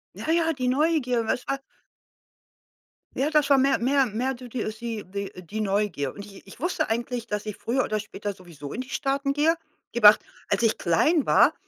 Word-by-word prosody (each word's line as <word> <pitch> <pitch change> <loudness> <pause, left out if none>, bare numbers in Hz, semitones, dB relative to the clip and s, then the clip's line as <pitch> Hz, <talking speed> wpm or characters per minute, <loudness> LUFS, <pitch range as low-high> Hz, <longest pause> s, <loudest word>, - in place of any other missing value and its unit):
Na - - -4
ja, 330 -1 +2
die 255 -4 -3
Neugier, 255 -4 +1
was 245 - -1
wa 275 0 -2 1.6
Ja, 275 - +1
das 295 -2 +2
war 275 - +7
mehr 270 +1 +3
mehr 270 +2 +3
mehr 245 +4 -2
du 250 0 -10
d 235 -1 -3
äh, - - -2
sie 225 -1 -5
die 200 +1 -6
äh, 185 - -10
die 205 +6 -5
Neugier. 200 -9 0
Und 200 - -8
ich 195 -1 -14
ich 195 - -14
wusste 350 +5 0
eigentlich, 235 +1 -2
dass 210 -1 -3
ich 210 -2 -5
früher 255 +3 0
oder 215 -3 -1
später 205 -1 -5
sowieso 170 -7 -10
in 240 - -4
die 260 - -13
Staaten 275 0 0
gehe. 305 +4 +3 0.4
Gib 235 -2 -3
Acht, 210 +1 +10 0.3
als - - +1
ich 225 -2 +2
klein 275 - +2
war, - - +5
235 Hz, 210 wpm, -25 LUFS, 210-275 Hz, 1.6 s, Acht